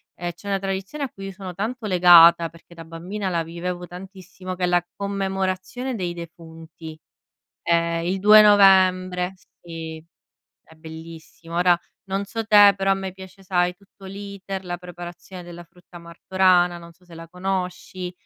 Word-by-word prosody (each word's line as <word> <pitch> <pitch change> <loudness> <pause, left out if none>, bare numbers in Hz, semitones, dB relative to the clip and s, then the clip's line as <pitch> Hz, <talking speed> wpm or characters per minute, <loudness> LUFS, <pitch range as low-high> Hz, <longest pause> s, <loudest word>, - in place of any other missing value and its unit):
ehm, 175 0 -4
c'è 190 +4 -14
una 195 -1 0
tradizione 195 +9 -4
a 260 - -7
cui 195 0 -9
io - - -6
sono 185 -1 -8
tanto 220 +5 -4
legata, 170 -2 +7
perché 165 +1 -18
da 165 - -10
bambina 180 +5 -5
la 170 -2 -1
vivevo 175 +2 -6
tantissimo, 185 0 -9
che 180 - -5
è - - 0
la 175 0 +1
commemorazione 195 +5 -3
dei 175 -4 -3
defunti. 165 -1 -11 0.6
È 170 - +1 0.3
il 185 +3 -2
2 210 +2 +8
novembre, 185 -3 +4 0.3
sì, 160 -2 -8 0.6
è 160 - -19
bellissimo. 160 +1 -11
Ora 175 -1 +4 0.3
non 195 +1 -2
so 225 +3 -4
te, 205 -2 +7
però 195 0 -1
a - - +5
me 190 -1 -5
piace, 190 +1 -13
sai, 180 -1 0
tutto 195 +1 -19
l'iter, 195 -1 -7
la 175 0 -4
preparazione 175 +1 -10
della 175 0 -10
frutta 175 0 -16
martorana, 175 +1 +1
non 170 0 -13
so 175 +2 -27
se 175 - -16
la 165 0 -10
conosci. 180 0 -4
180 Hz, 165 wpm, -22 LUFS, 170-195 Hz, 0.6 s, 2